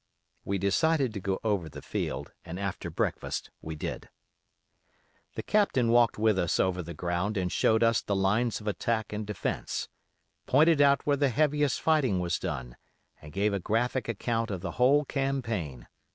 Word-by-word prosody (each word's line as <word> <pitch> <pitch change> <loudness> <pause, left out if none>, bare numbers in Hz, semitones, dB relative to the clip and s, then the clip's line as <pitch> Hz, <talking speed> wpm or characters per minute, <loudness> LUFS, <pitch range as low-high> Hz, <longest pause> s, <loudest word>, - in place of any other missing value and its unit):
We 100 - -1
decided 130 - +2
to 100 - -4
go 95 0 -2
over 100 -7 0
the - - -10
field, - - -3
and 85 +2 -7
after 100 -2 -3
breakfast - - -2
we 80 0 -6
did. 75 - -5 1.3
"The - - -4
Captain 195 - +2
walked 120 -2 +4
with 105 -2 +2
us 85 - 0
over 95 -1 +1
the 85 -1 -8
ground 90 +6 -1
and 90 -1 -1
showed 110 +1 +3
us 115 -2 +3
the 100 - -2
lines 105 +4 +1
of 105 - -10
attack 110 +1 -1
and 105 0 -4
defence; 105 -3 -3 0.6
pointed 155 +2 +5
out 140 -1 +4
where 145 -1 +2
the 140 -1 +2
heaviest 145 +1 +1
fighting 140 - +2
was 90 -1 -1
done, 65 -9 -5 0.4
and 75 - -11
gave 100 +5 0
a 100 - 0
graphic 115 +5 -1
account 115 +1 -1
of 95 -4 -4
the 95 - -4
whole 140 +4 +3
campaign. 115 - -2
105 Hz, 170 wpm, -29 LUFS, 95-130 Hz, 1.3 s, pointed